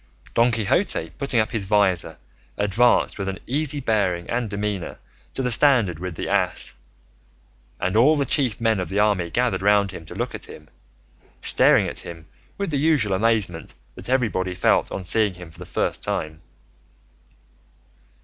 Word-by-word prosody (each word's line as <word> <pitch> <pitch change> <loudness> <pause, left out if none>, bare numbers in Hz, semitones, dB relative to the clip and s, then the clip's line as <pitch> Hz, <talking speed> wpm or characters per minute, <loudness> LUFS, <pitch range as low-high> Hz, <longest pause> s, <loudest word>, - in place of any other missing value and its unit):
Don 120 +1 +3
Quixote, 100 -7 0
putting 135 -4 +1
up 110 - 0
his 110 -5 -3
visor, 95 -6 +2 0.4
advanced 105 +3 +2
with 100 0 -2
an 95 - -5
easy 145 +2 -1
bearing 100 -8 0
and 120 -1 -1
demeanour 100 -3 -4 0.4
to 135 - -2
the 125 - 0
standard 115 - +3
with 90 -2 -5
the - - -5
ass, - - 0 1.1
and 95 +2 -1
all 135 +8 +5
the 140 -2 0
chief 130 -4 +1
men 115 -3 +1
of 90 -3 -4
the 95 - -3
army 100 -5 +1
gathered 120 -3 0
round 100 -1 +3
him 85 - -9
to - - -10
look - - -3
at - - -6
him, 75 -1 -13 0.7
staring - - +4
at - - -5
him 85 -2 -9 0.3
with 200 -4 -3
the 145 - 0
usual 140 -10 +2
amazement 100 -5 -1 0.2
that - - -10
everybody 105 -8 0
felt 90 - +1
on 95 - -5
seeing 100 +2 +2
him 90 -2 -11
for 80 - -18
the 90 - -9
first - - -2
time. 80 +1 -4
105 Hz, 170 wpm, -23 LUFS, 90-120 Hz, 1.1 s, all